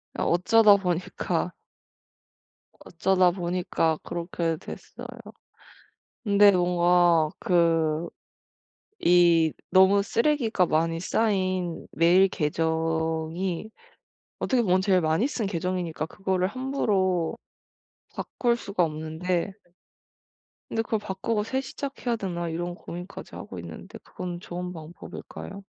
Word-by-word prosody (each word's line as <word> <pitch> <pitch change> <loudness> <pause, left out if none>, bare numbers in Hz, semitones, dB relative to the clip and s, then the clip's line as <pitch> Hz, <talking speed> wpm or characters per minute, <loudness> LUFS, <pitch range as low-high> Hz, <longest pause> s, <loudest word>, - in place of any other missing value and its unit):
아 - - -2
어쩌다보니까 190 -1 +2 1.3
어쩌다보니까 180 -2 +1
그렇게 170 -1 -2
됐어요. - - -9 1.2
근데 200 -1 +6
뭔가 175 -2 +3
그 165 -4 +2 0.9
이 170 -2 +4 0.2
너무 190 +2 +5
쓰레기가 230 -3 +1
많이 165 +1 0
쌓인 185 -4 0
메일 180 +4 +5
계정이 160 +3 -1 0.7
어떻게 255 -3 +1
보면 185 -2 +3
제일 190 -2 +3
많이 160 - +2
쓴 240 -7 -3
계정이니까 175 -4 -2
그거를 190 0 -1
함부로 200 -8 0 0.8
바꿀 240 -1 -1
수가 200 -6 0
없는데. 160 +4 -2 1.2
근데 225 - 0
'그걸 220 -1 -1
바꾸고 210 +2 -2
새 260 +4 -2
시작해야되나?' 220 -12 -4
이런 175 +2 -3
고민까지 175 +2 -9
하고 - - -8
있는데 - - -9
그거는 175 -1 -7
좋은 180 0 -6
방법일까요? 175 +4 -9
180 Hz, 240 characters per minute, -26 LUFS, 165-200 Hz, 1.3 s, 근데